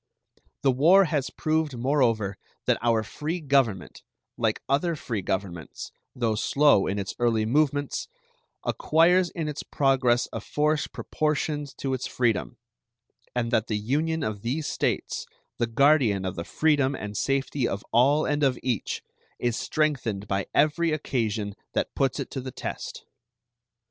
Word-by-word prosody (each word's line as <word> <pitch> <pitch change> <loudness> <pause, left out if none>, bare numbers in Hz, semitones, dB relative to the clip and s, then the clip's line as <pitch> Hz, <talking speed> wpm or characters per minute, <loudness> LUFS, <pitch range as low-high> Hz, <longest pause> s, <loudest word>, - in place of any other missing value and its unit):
The 135 - +5
war 165 +10 +6
has 150 -4 -1
proved 155 -4 -1
moreover 115 -6 +1 0.3
that - - +2
our 115 -2 +2
free 155 +10 -4
Government, 135 - 0 0.3
like - - 0
other 155 +5 +1
free 115 -8 -3
governments, 90 -3 -4 0.2
though 115 -3 +1
slow 135 0 +3
in 100 - -1
its 95 -2 -3
early 115 -2 +2
movements, 145 +3 +1 0.6
acquires 175 +3 +3
in 165 -3 -4
its 150 -1 -4
progress 130 -3 +2
a - - -3
force 150 0 0
proportioned 150 -2 -2
to 135 -1 -2
its 130 0 -2
freedom, 115 - 0 0.8
and 115 -1 0
that 110 -2 +2
the 105 - -1
union 150 +9 0
of 105 -4 -3
these 135 +7 -2
States, - - -2 0.3
the 120 - +1
guardian 120 -5 +3
of 95 - -2
the 85 - -5
freedom 145 -3 +2
and 105 -3 -6
safety 135 0 0
of 100 - -4
all 140 +6 +4
and 145 0 0
of 135 -3 +2
each, 120 -5 -2 0.3
is 120 -2 0
strengthened 130 -12 -1
by 95 -1 -1
every 155 +3 +2
occasion 110 -8 -1 0.2
that - - -1
puts 135 -2 0
it - - -4
to 135 - -4
the 130 - -6
test. - - -6
130 Hz, 150 wpm, -26 LUFS, 110-150 Hz, 0.8 s, war